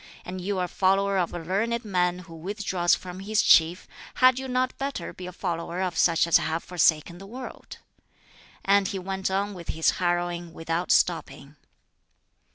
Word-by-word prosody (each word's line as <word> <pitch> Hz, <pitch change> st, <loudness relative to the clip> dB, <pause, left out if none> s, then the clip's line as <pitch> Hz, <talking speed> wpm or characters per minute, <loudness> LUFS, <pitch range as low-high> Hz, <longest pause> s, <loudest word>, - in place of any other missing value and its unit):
And 185 Hz, +1 st, -6 dB
you 195 Hz, +2 st, -2 dB
are 180 Hz, -, 0 dB
a -, -, -5 dB
follower 195 Hz, +2 st, +2 dB
of 175 Hz, -, 0 dB
a -, -, -5 dB
learned 215 Hz, +8 st, -1 dB
man 180 Hz, -3 st, +1 dB
who 165 Hz, -, -13 dB
withdraws 185 Hz, 0 st, 0 dB
from 180 Hz, 0 st, -9 dB
his 210 Hz, +2 st, +1 dB
chief; 165 Hz, +2 st, +4 dB, 0.3 s
had 255 Hz, 0 st, +5 dB
you 265 Hz, -, -5 dB
not 255 Hz, 0 st, 0 dB
better 275 Hz, -10 st, -4 dB
be 180 Hz, -, -8 dB
a -, -, -6 dB
follower 170 Hz, -1 st, -4 dB
of 180 Hz, -3 st, -2 dB
such 165 Hz, 0 st, +3 dB
as 170 Hz, -, +5 dB
have 160 Hz, +1 st, -2 dB
forsaken 170 Hz, -1 st, +1 dB
the 195 Hz, -, -11 dB
world?" 250 Hz, +4 st, -9 dB, 0.9 s
And 200 Hz, 0 st, +4 dB
he 200 Hz, -1 st, -3 dB
went 190 Hz, +1 st, -3 dB
on 200 Hz, +2 st, -1 dB
with 175 Hz, -3 st, -10 dB
his 160 Hz, 0 st, +2 dB
harrowing, 175 Hz, -1 st, -1 dB
without 165 Hz, +2 st, -3 dB
stopping. 150 Hz, -4 st, 0 dB
180 Hz, 175 wpm, -26 LUFS, 170-200 Hz, 0.9 s, had